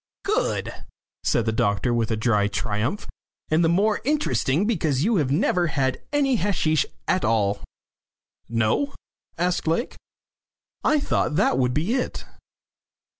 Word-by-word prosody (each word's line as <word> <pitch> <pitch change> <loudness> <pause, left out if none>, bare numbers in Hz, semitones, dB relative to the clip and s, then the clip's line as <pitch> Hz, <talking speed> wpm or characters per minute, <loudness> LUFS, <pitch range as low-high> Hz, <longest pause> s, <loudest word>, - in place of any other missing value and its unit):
"Good," 425 +2 0 0.5
said 115 - +1
the 110 - +1
doctor, 105 +2 +1
with 115 -2 0
dry 105 -3 +2
triumph. 105 - -2 0.5
"And 160 +2 +3
the 165 - +3
more 205 +5 +2
interesting 230 - +1
because 155 - 0
you 220 +2 +2
have 145 -6 +1
never 175 +4 +2
had 135 -4 -1
any 275 -3 +2
hasheesh 165 -6 +1 0.2
at 185 - +1
all." 105 -3 +1 0.9
"No?" 115 - 0 0.4
asked 175 0 0
Lake. 165 +10 -1 0.9
"I 305 - +3
thought 150 - 0
that 130 - +2
would 125 -1 +1
be 170 +10 0
it." 255 -1 -2
155 Hz, 130 wpm, -24 LUFS, -, 0.9 s, And